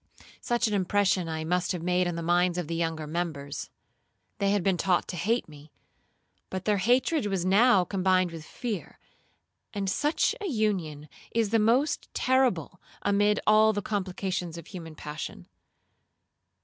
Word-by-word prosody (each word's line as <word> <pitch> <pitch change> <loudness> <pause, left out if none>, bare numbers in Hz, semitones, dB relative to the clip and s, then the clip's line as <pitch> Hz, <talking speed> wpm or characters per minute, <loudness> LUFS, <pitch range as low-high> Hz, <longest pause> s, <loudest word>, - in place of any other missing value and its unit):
Such 240 -1 +1
an 210 - -2
impression 190 -2 +1
I 160 0 -3
must 180 +3 0
have 175 -2 -5
made 180 0 +2
on 175 - -2
the 170 - -4
minds 175 +1 +2
of 175 -4 -2
the 165 - -3
younger 165 -2 -2
members. 150 -3 -4 0.7
They 200 - +2
had 200 -2 +1
been 190 0 +2
taught 180 0 +1
to - - -4
hate 220 +9 0
me, 150 -1 -14 0.8
but 185 0 -5
their 210 -1 +2
hatred 250 - +2
was 190 -3 -1
now 200 +1 +5
combined 185 -1 +1
with 165 -2 -8
fear, 220 +2 -5 0.8
and 200 -1 -2
such 295 - +1
a 410 - -2
union 190 - -1 0.3
is 225 -3 +1
the 225 - +4
most 245 +8 +1
terrible 250 - +1 0.2
amid 205 +1 +3
all 215 +1 +5
the 205 -1 -3
complications 185 -4 -3
of 170 - -9
human 165 -5 -9
passion. 150 +1 -7
185 Hz, 160 wpm, -28 LUFS, 170-210 Hz, 0.8 s, now